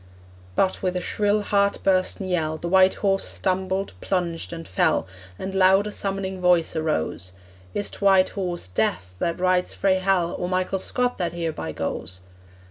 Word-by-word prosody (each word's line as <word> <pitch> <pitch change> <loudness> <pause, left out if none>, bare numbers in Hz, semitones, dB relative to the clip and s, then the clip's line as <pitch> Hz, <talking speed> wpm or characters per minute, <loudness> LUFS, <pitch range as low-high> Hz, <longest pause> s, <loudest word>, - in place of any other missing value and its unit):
But, 190 -1 +1
with 185 -1 -1
a - - +1
shrill 205 +3 0
heart 200 -1 +2
bursten 190 0 +1
yell 160 -4 0
The 170 - -5
white 190 +1 +5
horse 195 0 +2
stumbled, 190 +1 -1
plunged, 175 -3 -2
and 165 -1 -7
fell, 175 -4 +2 0.3
And 190 - -5
loud 190 +1 +5
a 210 - -4
summoning 195 -2 -3
voice 180 -2 +3
arose, 90 - -1 0.4
'Is't 205 - -3
White 195 -2 +5
Horse 180 - -3
Death 90 -1 -1
that 170 +1 -1
rides 185 0 +1
frae 190 -1 +2
Hell, 185 -2 +1
Or 180 - -2
Michael 185 +1 0
Scott 250 +5 0
that 170 -2 -1
hereby 160 - -3
goes?' 90 +4 -4
185 Hz, 160 wpm, -24 LUFS, 170-195 Hz, 0.4 s, white